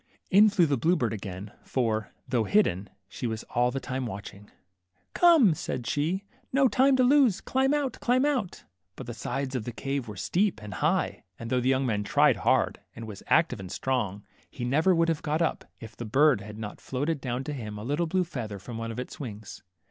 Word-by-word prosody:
In 210 +3 +7
flew 195 -4 +3
the 140 -5 0
blue 170 +6 +3
bird 120 -8 -1
again, 100 -1 -7
for, 110 -4 -1 0.2
though 120 -3 +1
hidden, 105 - +2 0.2
she 120 - -5
was 110 0 -4
all 125 0 +3
the 135 +2 -3
time 130 -1 -4
watching. 100 -1 -9 0.6
Come," 325 - +6
said 130 -4 -4
she, 165 +10 -1 0.3
no 270 0 +4
time 265 +2 +4
to 255 - +3
lose; 255 -6 +4
climb 265 +1 +1
out, 290 -3 -1
climb 255 +3 +2
out! 255 -11 -1 0.2
" 90 +1 -53
But 130 - -8
the 120 - -6
sides 130 +4 -3
of 125 -4 -2
the 120 - -5
cave 135 +1 -3
were 105 - -8
steep 200 +2 0
and 105 -2 -8
high, 85 - 0
and 115 0 -7
though 125 -1 +2
the 125 - +1
young 135 0 +2
man 105 -4 0
tried - - +3
hard, - - +1 0.2
and 115 - -7
was 105 -3 -9
active 160 -9 +3
and 95 -1 -8
strong, 105 -7 -2 0.3
he 120 - -5
never 155 +9 +3
would 165 0 +3
have 165 -3 0
got 155 +1 -1
up, 165 - -1
if 110 -2 -10
the - - -6
bird 135 0 +4
had 105 +1 -9
not 105 -2 -7
floated 145 +3 -2
down 125 0 -3
to 150 - -4
him 105 -6 -6
a 105 - -7
little 145 +7 0
blue 185 +3 +1
feather 115 - -5
from 115 +4 -8
one 115 0 -4
of 115 - -7
its 125 - -7
wings. 110 -7 -8
130 Hz, 220 wpm, -27 LUFS, 110-170 Hz, 0.6 s, In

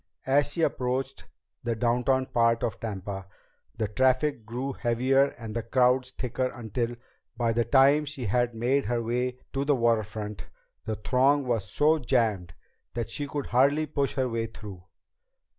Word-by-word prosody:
As 140 +2 +3
she 165 - 0
approached 130 0 -2 0.4
the 120 -1 -1
downtown 125 +3 +1
part 115 -1 +2
of 120 - -2
Tampa, 100 -3 -5 0.5
the 110 -2 0
traffic 130 +1 +1
grew 130 +4 -3
heavier 130 +4 +2
and 110 -2 -7
the 115 - 0
crowds 125 +2 +2
thicker 130 0 -2
until, 120 0 -3 0.4
by 115 -1 +1
the 120 0 +1
time 140 +2 +5
she 140 -4 -6
had 120 +3 +1
made 130 +5 +1
her 120 +1 -1
way 125 +2 -1 0.2
to 135 0 0
the 145 0 +2
waterfront, 110 -3 -1 0.4
the 110 - -2
throng 135 +5 +2
was 115 -5 -1
so 155 +2 +3
jammed 105 - 0 0.4
that 120 -1 -3
she 145 - -3
could 145 0 -4
hardly 140 +5 +3
push 140 -2 -1
her 130 -1 +1
way 115 -1 -2
through. 100 -5 -10
125 Hz, 160 wpm, -27 LUFS, 115-135 Hz, 0.5 s, time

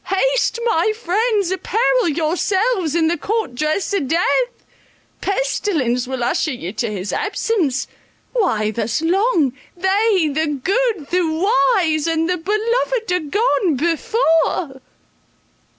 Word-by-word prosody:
Haste, - - +1
my 430 -1 +2
friends, 420 -1 0
apparel 450 +3 +1
yourselves 350 - 0
in 325 -1 +3
the 335 -1 0
court 435 - -2
dress 305 +10 -1
of 330 -9 0
death. 485 - 0 0.6
Pestilence 325 - -1
will 260 -2 -3
usher 310 +4 0
you 190 -6 -6
to 225 0 -2
his 195 -1 -4
presence. 395 - -1 0.5
Why 225 - +1
thus 225 +7 -2
long? 345 - +2 0.2
they, 380 -1 +2
the 295 -1 -1
good, 415 - 0
the 365 +1 +2
wise, 345 -1 +2
and 325 0 +1
the 360 0 0
beloved, 445 +4 -1
are 360 - +2
gone 405 - +1
before. 330 - 0
360 Hz, 120 wpm, -19 LUFS, 305-430 Hz, 0.6 s, in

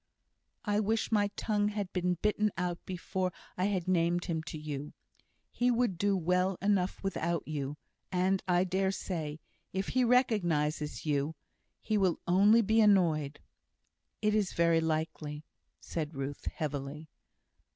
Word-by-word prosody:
"I 205 -1 +2
wish 220 +2 0
my 205 -2 +3
tongue 210 -2 +1
had 205 -2 -3
been 180 -1 +1
bitten 210 0 +2
out 175 -1 -2
before 185 0 -2 0.2
I 180 - 0
had 190 -3 -1
named 175 -1 +2
him 165 -3 -1
to 165 - -6
you. 150 -1 -5 0.6
He 245 0 +1
would 235 -7 +1
do 200 0 +2
well 180 +2 +1
enough 195 -2 +1
without 170 -3 -1
you; 145 -1 -3 0.3
and, 185 +1 +2
I 180 0 +3
dare 190 +1 +1
say, 160 -6 -4 0.3
if 190 +1 -2
he 255 - +2
recognises 175 - +1
you, 150 +1 0 0.4
he 215 -1 0
will 185 -3 +2
only 205 +6 +5
be 220 +2 +4
annoyed." 165 -8 +3 0.8
"It 210 0 +3
is 210 -3 +1
very 170 -1 +3
likely," 155 -2 -2 0.4
said 155 -2 -4
Ruth, 135 +1 -5
heavily. 150 0 -4
180 Hz, 140 wpm, -31 LUFS, 160-205 Hz, 0.8 s, only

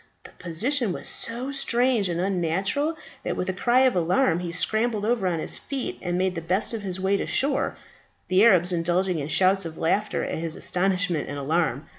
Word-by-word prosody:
The - - -12
position 220 - 0
was - - -6
so 245 +4 -2
strange 245 -6 +1
and 170 0 -2
unnatural 195 - 0 0.3
that - - -2
with 180 - -2
a - - 0
cry 240 +7 +2
of 260 -4 +3
alarm 180 +2 +2
he 175 -1 -4
scrambled 220 +3 +1
over 225 -4 +1
on 175 - 0
to 160 - -3
his - - -2
feet, 275 -2 -5
and 175 0 -2
made 185 0 +1
the 165 - -4
best 185 +8 -1
of 225 - -3
his 190 -2 -4
way 190 +1 +1
to - - -3
shore, 275 0 0 0.5
the 185 +2 +4
Arabs 185 -6 +5
indulging 175 +1 0
in 140 - -4
shouts 190 +4 +3
of 165 -1 -7
laughter 205 +6 0
at - - -3
his 165 -1 -2
astonishment 180 -3 0
and 145 - -5
alarm. 150 -1 -1
185 Hz, 205 wpm, -25 LUFS, 170-230 Hz, 0.5 s, Arabs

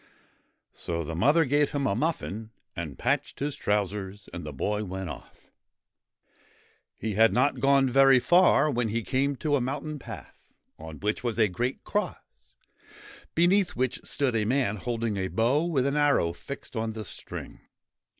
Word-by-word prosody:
So 85 -1 -4
the 80 - -5
mother 145 - +4
gave 145 +1 +2
him 140 -1 0
a 100 - +2
muffin 115 - -2 0.3
and 80 -5 -5
patched - - -1
his 145 0 -2
trousers, 100 -3 -2
and 85 - -6
the 75 - -6
boy 105 +10 -2
went 95 -3 -5
off. 65 - -13 1.5
He 110 -1 -3
had 110 +3 +5
not 130 +4 +2
gone 135 -1 +4
very 135 +1 +6
far 155 0 +4
when 120 -3 0
he 115 +2 -1
came 140 +4 0
to 145 +1 0
a 135 - +1
mountain 145 +4 -3
path, - - -10 0.4
on 80 0 -9
which 105 +3 -1
was 120 -2 -2
a 110 -2 +4
great 120 +7 -3
cross, - - -5 0.8
beneath 180 +3 +3
which 130 0 -1
stood 135 -4 0
a 110 - +2
man 115 -2 +1
holding 115 0 -2
a 95 -1 -1
bow 120 - +1
with 145 -7 +1
an 140 +1 0
arrow 145 - +3
fixed 130 +11 -9
on 110 0 -2
the 110 -1 -6
string. - - -8
120 Hz, 165 wpm, -27 LUFS, 100-140 Hz, 1.5 s, very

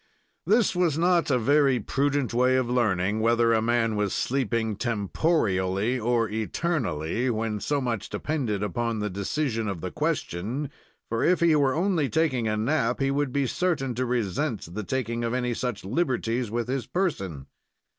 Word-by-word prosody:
This 215 -1 +3
was 175 -4 +2
not 175 -1 +2
a 130 - +3
very 135 +1 +3
prudent 140 +3 0
way 125 +2 +3
of 130 -2 +1
learning 105 -4 +1
whether 115 +1 +3
a 110 - +3
man 115 -1 +1
was 105 -2 0
sleeping 115 -4 0
temporially 105 - 0
or 115 -1 +2
eternally, 110 - -1
when 110 -2 -1
so 145 +7 0
much 120 -6 -3
depended 120 -10 -2
upon 115 +3 -1
the 105 -1 -2
decision 115 +4 -2
of 100 -4 -3
the - - -5
question, 115 - -2 0.4
for, 115 0 -1
if 180 0 +3
he 170 -2 +4
were 140 -3 +2
only 170 -5 +1
taking 145 -8 +1
a 110 0 0
nap, 120 +1 0
he 135 0 +1
would 140 -1 0
be 140 +1 +1
certain 135 -3 -1
to 125 +2 -2
resent 115 - -2
the 105 +2 -4
taking 120 0 -2
of 115 +1 -1
any 125 -1 0
such 120 -4 -3
liberties 125 - -1
with 120 +2 -2
his 130 -2 -2
person. 95 - -2
120 Hz, 165 wpm, -26 LUFS, 110-140 Hz, 0.4 s, he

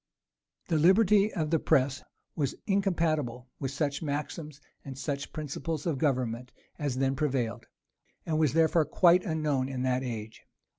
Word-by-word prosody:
The 160 -3 +2
liberty 200 +4 +5
of 155 -5 -2
the 165 - +3
press 135 -3 +2 0.3
was 140 -4 -1
incompatible 155 - 0
with 135 - -2
such 140 +1 -2
maxims 150 0 -4 0.2
and 135 -2 -8
such 140 0 -4
principles 155 +1 -4
of 155 -6 -1
government 125 -4 -1 0.3
as 145 -4 -1
then 135 0 +1
prevailed, 130 -6 -1 0.6
and 155 -1 0
was 155 -3 +2
therefore 160 0 +3
quite 175 +4 +4
unknown 150 -5 0
in 130 -2 -3
that 130 0 +1
age. 110 -4 -6
145 Hz, 145 wpm, -29 LUFS, 130-160 Hz, 0.6 s, liberty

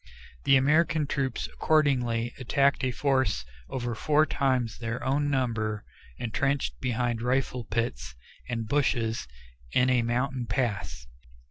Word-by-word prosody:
The 135 - +6
American 155 +3 +3
troops 135 -3 -2
accordingly 125 -7 +2
attacked 140 +2 +2
a 130 - +2
force 130 - +1 0.2
over 120 -2 -3
four 150 +6 +3
times 130 -6 0
their 115 0 -4
own 145 +2 +1
number 115 -6 -1 0.3
intrenched 135 +4 -1
behind 120 -2 -1
rifle 125 -1 0
pits 110 - -3 0.3
and 115 -2 -2
bushes 115 - 0 0.5
in 125 +1 +4
a 125 -1 +4
mountain 125 +1 -1
pass. 100 - -2
125 Hz, 120 wpm, -28 LUFS, 115-135 Hz, 0.5 s, The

